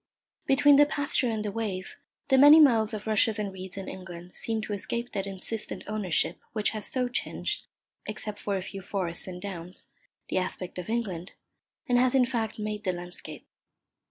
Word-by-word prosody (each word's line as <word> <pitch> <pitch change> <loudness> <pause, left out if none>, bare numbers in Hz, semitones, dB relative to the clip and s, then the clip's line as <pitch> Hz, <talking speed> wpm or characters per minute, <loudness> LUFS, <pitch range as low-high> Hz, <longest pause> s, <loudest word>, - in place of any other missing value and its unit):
Between 285 +1 +6
the 290 0 +7
pasture 285 -4 +1
and 215 -2 -2
the 205 - -1
wave, 200 -4 -4 0.3
the 265 - +5
many 290 +3 +10
miles 230 -7 +5
of 215 -2 -5
rushes 220 0 +3
and 205 -2 -3
reeds 190 0 -7
in 195 - -5
England 180 -1 -8
seem 225 -1 -1
to 215 - -4
escape 235 +4 -3
that 195 0 -2
insistent 195 +3 -1
ownership 190 -5 0
which 215 -2 +1
has 215 -1 -4
so 255 -1 0
changed 245 - -2 0.4
(except 210 -1 -4
for 200 -1 -1
a 185 - -4
few 195 +1 -7
forests 180 -2 -2
and 180 -1 -6
downs) 180 -2 -7 0.4
the - - +1
aspect 185 -1 -4
of 180 - -6
England, 195 -7 -2 0.5
and 245 0 +4
has 255 +1 +3
in 255 -2 +5
fact 225 -3 -2
made 210 0 -4
the 185 - +1
landscape. 175 0 -8
210 Hz, 185 wpm, -28 LUFS, 185-235 Hz, 0.5 s, many